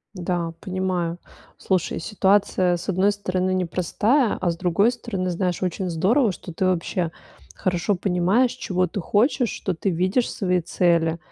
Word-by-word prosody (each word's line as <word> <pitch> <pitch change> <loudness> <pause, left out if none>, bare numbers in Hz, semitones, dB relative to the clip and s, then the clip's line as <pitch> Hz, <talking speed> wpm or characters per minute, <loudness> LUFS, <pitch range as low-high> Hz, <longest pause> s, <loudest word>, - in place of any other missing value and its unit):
Да, 175 -2 -2
понимаю. 185 -3 -2 0.4
Слушай, 185 -3 -1
ситуация, 190 -2 +2
с 175 - -9
одной 195 +2 +2
стороны, 185 -2 -1
непростая, 185 - +1
а 180 -2 +1
с 170 - -6
другой 185 +6 +2
стороны, 195 -7 -3
знаешь, 180 0 -1
очень 185 +1 -2
здорово, 205 - +2
что 175 -1 -9
ты 185 - -1
вообще 180 -1 0 0.4
хорошо 180 - 0
понимаешь, 190 +7 +2
чего 185 -8 -1
ты 180 +3 -5
хочешь, 235 - +2
что 190 - -3
ты 180 +4 -2
видишь 185 +8 +1
свои 180 -3 0
цели, 170 -1 +1
185 Hz, 150 wpm, -23 LUFS, 175-200 Hz, 0.4 s, ситуация